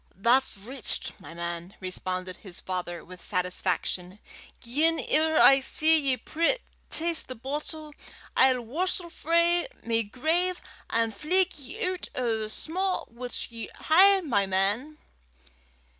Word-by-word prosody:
"That's 235 +5 +2
richt, 240 +5 -2
my 165 - -11
man," 170 +2 -6
responded 185 0 -4
his 185 -4 -9
father 175 -2 -5
with 180 0 -12
satisfaction. 180 0 -2 0.4
"Gien 310 +7 +1
ever 315 +1 +2
I 270 0 +8
see 315 +4 +6
ye 270 -3 +1
pree 335 - +1 0.3
(taste) 335 0 0
the 255 - -6
boatle, 300 +4 -5 0.4
I'll 260 -1 +4
warstle 345 +6 -2
frae 340 +5 +2 0.2
my 230 0 +2
grave 325 - 0 0.3
an' 230 0 +1
fleg 360 - +2
ye 265 +4 -5
oot 365 -1 -3
o' 235 -3 0
the 215 -1 -3
sma' 370 - -2
wuts 245 +1 -5
ye 230 -1 -7 0.2
hae, 385 +4 +7
my 220 - 0
man." 205 +11 0
255 Hz, 130 wpm, -27 LUFS, 200-320 Hz, 0.4 s, I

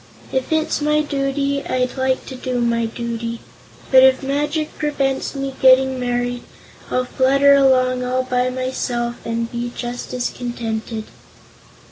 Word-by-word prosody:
If 260 +2 -2
it's 315 -1 +1
my 300 +1 +2
duty, 280 0 -1
I'd 255 -1 -1
like 260 -1 0
to 260 - -7
do 250 -1 -3
my 235 -1 +1
duty, 235 0 -4 0.5
but 260 -1 +8
if 265 0 +5
magic 295 +3 -1
prevents 280 -3 -1
my 275 0 -3
getting 260 0 +5
married 245 0 -1 0.5
I'll 255 0 0
flutter 275 +2 +4
along 255 -2 +3
all 255 +1 0
by 250 0 0
myself 250 -2 -3
and 230 0 -3
be 240 0 -3
just 245 0 -5
as 250 -1 -1
contented." 225 -2 -4
255 Hz, 140 wpm, -20 LUFS, 240-275 Hz, 0.5 s, but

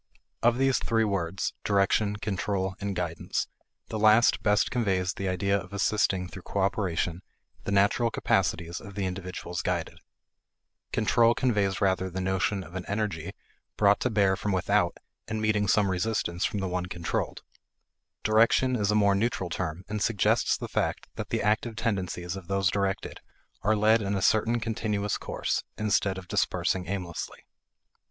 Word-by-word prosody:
Of 120 +1 +3
these 135 -2 +3
three 115 -1 +1
words, 95 -3 -1
direction, 100 +1 +2
control, 100 -2 -2
and 100 -1 -2
guidance, 85 -2 -2 0.4
the 110 - -3
last 110 +3 +5
best 105 0 +2
conveys 95 -6 0
the 100 - -4
idea 100 +2 +1
of 95 -1 -4
assisting 95 -2 +1
through 95 - -10
cooperation 95 -3 -1 0.4
the - - -2
natural 100 +4 +3
capacities 85 -5 0
of 100 -3 -11
the 100 -2 -1
individuals 90 -1 -4
guided; - - -2 0.9
control 115 +2 +3
conveys 100 -6 +1
rather 95 -1 +1
the 95 +1 -5
notion 95 +1 0
of 85 - -13
an 95 -1 -4
energy 100 -4 -2 0.4
brought 100 -1 +4
to 125 - 0
bear 100 -4 +3
from 105 - -2
without 95 - +1 0.3
and 110 - -2
meeting 105 -1 +1
some 100 -1 +3
resistance 95 -2 -1
from 110 -7 -2
the 95 - -1
one 90 0 -2
controlled; 85 -2 -3 0.8
direction 115 +4 +4
is 105 -3 0
a 105 - +3
more 100 -1 +4
neutral 100 -3 -1
term 80 +4 -3
and 105 -1 -3
suggests 105 -1 +2
the - - -5
fact - - -1
that - - -6
the - - -1
active 110 +2 +1
tendencies 95 -5 -2
of 95 -3 -9
those 95 -2 +1
directed 100 -1 -2 0.4
are 110 +2 +2
led 110 +2 +4
in 100 0 -1
a 95 - -1
certain 115 +2 +3
continuous 105 -2 -1
course, - - -2
instead 100 -2 +1
of 90 -1 -8
dispersing 90 +1 0
aimlessly. 90 -4 -5
100 Hz, 160 wpm, -28 LUFS, 95-110 Hz, 0.9 s, last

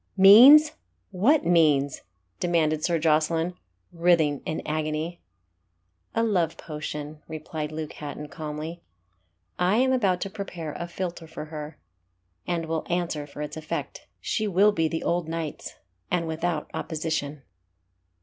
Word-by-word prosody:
"Means! 255 +11 +9 0.4
what 235 +12 +3
means?" 150 -5 +3 0.4
demanded 155 -3 +1
Sir 170 -2 +2
Jocelyn, 160 +2 +1 0.4
writhing 165 -4 +2
in 155 - -3
agony. 155 +2 -3 0.9
"A 230 - +2
love 180 -8 +1
potion," 150 -1 -6
replied 155 -1 -5
Luke 155 -1 -5
Hatton, 150 0 -7
calmly, 155 +3 -6 0.8
"I 180 +3 +3
am 260 +1 +3
about 195 -8 +2
to 195 - -2
prepare 175 -7 -6
a 170 - -5
philter 170 -1 -5
for 155 - -7
her, 150 -1 -8 0.7
and 170 -2 -1
will 160 -1 -2
answer 170 -4 -2
for 145 +1 -7
its 150 - -6
effect. 155 0 -5
She 215 -2 -1
will 200 +2 +4
be 165 -5 +1
the 160 +1 -3
old 170 -2 -1
knight's, 165 -2 -5 0.3
and 170 -2 0
without 160 0 -2
opposition." 155 -3 -3
165 Hz, 130 wpm, -26 LUFS, 155-180 Hz, 0.9 s, Means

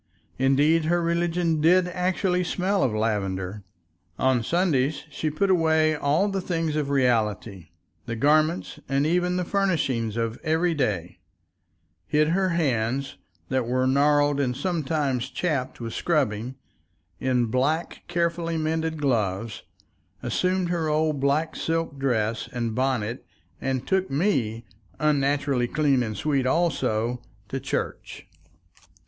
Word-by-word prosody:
Indeed, 145 +5 +3
her 175 +2 +2
religion 170 -1 0
did 180 +3 +4
actually 180 0 0
smell 190 +2 0
of 130 - +2
lavender; 105 -3 -2 0.6
on 130 -2 +2
Sundays 150 -1 +1
she 155 - -2
put 190 +6 +1
away 160 -3 +3
all 150 +7 +1
the 195 -1 -2
things 165 -4 -1
of 150 -2 -1
reality, 110 - 0 0.4
the 115 - -3
garments 155 +7 +2
and 135 +1 +2
even 180 +2 +1
the 180 - -1
furnishings 140 - 0
of 115 0 -2
everyday, 155 - 0 0.9
hid 150 +1 +2
her 185 +2 +2
hands, 135 -5 -1 0.3
that 130 -3 0
were 130 +1 +1
gnarled 145 +1 +3
and 125 -3 0
sometimes 150 -7 -1
chapped 145 -8 -2
with 115 -2 -5
scrubbing, 130 -7 0 0.6
in 125 -2 +1
black, 135 +8 -1
carefully 170 -1 -1
mended 160 0 -1
gloves, 110 -6 -1 0.6
assumed 185 -1 0
her 170 -2 0
old 155 -1 +1
black 145 +4 +1
silk 165 -4 -2
dress 115 -4 0
and 120 -2 -2
bonnet 125 -2 -1 0.4
and 130 -1 -2
took 190 0 +1
me, 135 - 0 0.3
unnaturally 140 -3 +1
clean 140 -2 +2
and 110 -4 -3
sweet 140 -1 0
also, 125 -7 0 0.3
to 135 - -3
church. 135 - -4
145 Hz, 125 wpm, -25 LUFS, 125-165 Hz, 0.9 s, did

